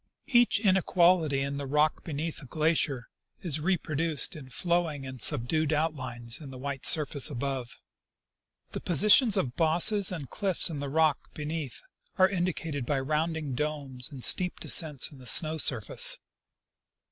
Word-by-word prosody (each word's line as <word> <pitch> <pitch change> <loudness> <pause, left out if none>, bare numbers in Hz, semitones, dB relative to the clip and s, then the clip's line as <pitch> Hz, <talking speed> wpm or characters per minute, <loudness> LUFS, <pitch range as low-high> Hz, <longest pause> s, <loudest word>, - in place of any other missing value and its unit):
Each 240 -4 +3
inequality 180 -7 +2
in 140 +1 -4
the 140 -1 -6
rock 150 +2 0
be 165 - -8
neath 155 +3 -4
the 135 - -12
glacier 150 -4 -1 0.4
is 155 -4 +1
reproduced 160 -3 -1
in 135 -4 -11
flowing 165 -1 -2
and 130 -1 -9
subdued 150 +3 0
outlines 130 -7 -3
in 145 - -10
the 130 - -10
white 135 0 -2
surface 150 -3 +3
above. 135 -2 -5 0.9
The - - -3
positions 210 - +5
of 125 -2 -2
bosses 175 +5 +3
and 160 -7 -6
cliffs 190 - 0
in 150 - -6
the 140 -1 -5
rock 155 -1 0
beneath 150 -2 -6 0.3
are 185 -1 +5
indicated 175 -6 -4
by 135 +3 -2
rounded 155 0 -3
domes 140 -3 -5
and 135 -5 -10
steep 180 -1 +3
descents 150 -4 +2
in 140 - -15
the 125 - -13
snow 160 +5 +4
surface. 115 -8 +2
150 Hz, 150 wpm, -27 LUFS, 135-165 Hz, 0.9 s, positions